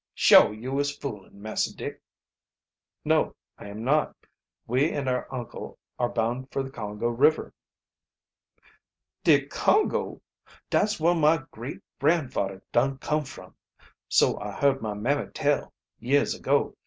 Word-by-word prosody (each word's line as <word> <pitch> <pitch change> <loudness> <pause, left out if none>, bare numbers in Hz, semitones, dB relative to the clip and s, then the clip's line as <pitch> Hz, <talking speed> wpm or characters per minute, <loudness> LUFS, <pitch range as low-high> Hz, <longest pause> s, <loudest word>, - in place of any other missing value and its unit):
Shuah 105 - +6
yo' 130 +4 -2
is 145 0 +1
foolin', 105 -7 -8
Massah 110 +1 -2
Dick?" - - -6 1.0
"No, - - +2 0.2
I - - -9
am 105 +2 -7
not. 150 +5 +1 0.5
We 130 +6 +2
and 140 -2 -3
our 125 -1 -1
uncle 125 -3 -7 0.2
are 120 - +1
bound 120 +4 -2
for 135 - -1
the 135 - -8
Congo 105 -2 -4
River." 140 +7 +2 1.7
"De - - +5
Congo! 425 - +1 0.5
Dat's 210 -2 +2
whar 170 +2 +4
my 160 -2 +3
great 120 +6 -7 0.2
gran' 150 0 +2
fadder 95 -5 -3
dun 135 +3 +2
come 150 +2 -1
from 130 - -12 0.5
so - - +3
I - - -5
heard 140 -1 +2
my 105 -2 -3
mammy 135 +8 -1
tell, 145 -1 0 0.3
years 140 +5 +2
ago. - - 0
130 Hz, 140 wpm, -26 LUFS, 115-145 Hz, 1.7 s, Shuah